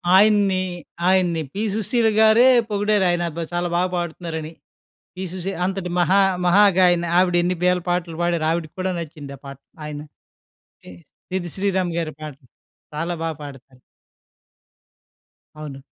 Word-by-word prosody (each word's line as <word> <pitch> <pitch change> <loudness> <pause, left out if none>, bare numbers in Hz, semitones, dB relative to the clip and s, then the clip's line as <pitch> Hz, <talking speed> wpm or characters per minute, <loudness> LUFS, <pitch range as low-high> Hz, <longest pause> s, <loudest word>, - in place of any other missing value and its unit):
ఆయన్ని 200 -2 +4 0.5
ఆయన్ని 175 -4 +2
'పి 205 +3 -3
సుశీల' 220 +1 +1
గారే 220 +3 +6 0.2
పొగిడారు 205 -1 +1
ఆయన 175 0 0
అబ్బా! 165 +2 -5
చాలా 175 0 -1
బాగా 180 +1 +1
పాడుతున్నారని. 165 -2 -5 0.6
'పి 190 +1 -5
సుశీల' 185 0 -5
అంతటి 190 -2 -3
మహా 190 +3 +4 0.3
మహాగాయని 180 -2 +4
ఆవిడ 180 -1 +3
ఎన్ని 180 +1 0
వేల 180 0 +3
పాటలు 175 -2 -1
పాడారో 170 -2 0
ఆవిడకి 165 -2 -3
కూడా 185 0 -1
నచ్చింది 145 -4 -8
ఆ - - -40
పాట. 140 -1 -9 0.3
ఆయన 150 -1 -6 0.8
తే - - -12 0.5
'సిద్ 175 -2 -3
శ్రీరామ్' 190 -3 -1
గారి 160 -2 -3
పాటలు 140 -4 -10 0.5
చాలా 165 +3 -2
బా 165 - -1
పాడతారు. 135 -2 -12 1.8
అవును. 145 -3 -8
175 Hz, 135 wpm, -22 LUFS, 160-190 Hz, 1.8 s, గారే